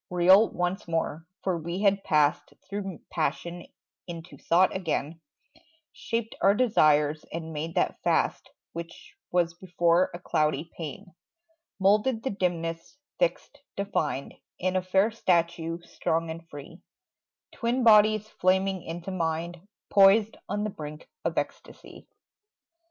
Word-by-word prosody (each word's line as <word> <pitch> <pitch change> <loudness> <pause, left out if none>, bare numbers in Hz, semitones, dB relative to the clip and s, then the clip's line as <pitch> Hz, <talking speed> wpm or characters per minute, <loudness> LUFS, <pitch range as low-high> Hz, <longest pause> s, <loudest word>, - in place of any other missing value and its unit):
Real 185 +5 +6
once 180 +2 -2
more: 165 -1 -2 0.2
for 180 -3 0
we 170 +5 -4
had 200 -1 +3
passed 150 -2 +1
Through 195 -4 -5
passion 170 +1 -2 0.4
into 170 0 -8
thought 180 +3 +2
again; 165 -3 -2 0.7
Shaped 230 -2 -3
our 195 +1 +5
desires 155 -10 +3
and 160 -1 -5
made 160 +2 -4
that - - 0
fast - - 0 0.2
Which 170 - -9 0.2
was 175 -1 +2
before 175 0 +2
a - - -6
cloudy 155 -2 -1
pain; 170 +3 -8 0.7
Moulded 215 +4 +3
the 265 - -1
dimness, 170 - -3 0.2
fixed, - - -1 0.2
defined 160 -9 -2 0.2
In 185 +1 -1
a 185 - +2
fair 190 +4 +2
statue, 170 -5 0
strong 165 -1 -2
and 165 0 -9
free, 145 +5 -11 0.7
Twin 245 +2 -1
bodies 215 -1 +6
flaming 190 -1 +1
into 170 +3 -6
mind, 170 +1 -3 0.2
Poised 205 +2 +6
on 205 +2 -1
the 215 - -2
brink 150 -2 -9 0.2
of - - -2
ecstasy. - - -6
175 Hz, 125 wpm, -27 LUFS, 165-200 Hz, 0.7 s, Real